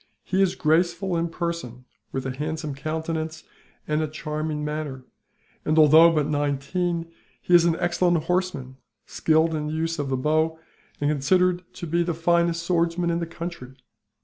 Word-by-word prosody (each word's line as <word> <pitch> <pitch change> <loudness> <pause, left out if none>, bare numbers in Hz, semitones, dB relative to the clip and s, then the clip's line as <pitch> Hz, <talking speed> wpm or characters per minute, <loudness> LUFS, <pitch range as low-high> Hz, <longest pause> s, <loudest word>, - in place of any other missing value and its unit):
He 190 +1 0
is 190 -2 +2
graceful 170 +3 +1
in 170 0 0
person, 165 -8 -5 0.3
with 135 -1 -3
a 130 -1 -3
handsome 155 +1 -3
countenance 160 +2 -4 0.4
and 150 +1 +1
a 155 - 0
charming 150 0 -4
manner 150 -4 -4 0.6
and, 155 +1 0
although 160 +2 +8
but 155 -3 +1
nineteen, 155 +4 -1 0.3
he 180 - -2
is 170 -1 +7
an 170 -1 +3
excellent 175 -2 +1
horseman, 165 -7 -2 0.3
skilled 160 +1 +2
in 150 -1 -2
the 155 - -3
use 165 +1 -2
of 140 -2 -2
the 130 - 0
bow, 155 +4 +1 0.4
and 145 +1 +1
considered 180 +5 +2
to - - -6
be 170 +2 +1
the 170 -1 -1
finest 170 0 +1
swordsman 170 0 +1
in 170 - 0
the 170 - -3
country. 165 -6 -7
160 Hz, 165 wpm, -24 LUFS, 150-170 Hz, 0.6 s, although